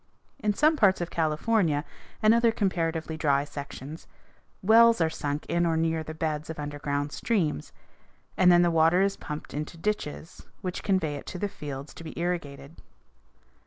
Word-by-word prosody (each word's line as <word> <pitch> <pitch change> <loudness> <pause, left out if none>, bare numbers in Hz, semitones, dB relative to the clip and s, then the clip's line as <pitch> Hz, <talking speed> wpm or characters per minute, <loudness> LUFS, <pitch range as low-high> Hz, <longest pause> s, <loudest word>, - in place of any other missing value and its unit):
In 210 -5 0
some 310 +5 +3
parts 195 -6 +4
of 175 -1 -4
California 160 0 +1 0.4
and 215 +1 +6
other 235 0 +4
comparatively 165 -6 -1
dry 140 -2 +2
sections, 145 +1 -8 0.6
wells 230 +3 +6
are 160 -1 +2
sunk 145 -2 -3
in 170 0 0
or 165 -1 +1
near 160 0 0
the 155 0 -7
beds 155 -1 -3
of 160 - -5
underground 145 -1 -3
streams, 165 - -1 0.6
and 180 -1 +5
then 175 0 +6
the 175 - +3
water 165 +3 +4
is 195 0 +1
pumped 150 0 -7
into 150 +3 -5
ditches 165 -4 -4
which 185 -2 -4
convey 165 -7 0
it - - -11
to - - -5
the 205 - -1
fields 145 -6 -7
to - - -11
be 160 - -9
irrigated. 155 -4 -4
165 Hz, 165 wpm, -27 LUFS, 150-190 Hz, 0.6 s, and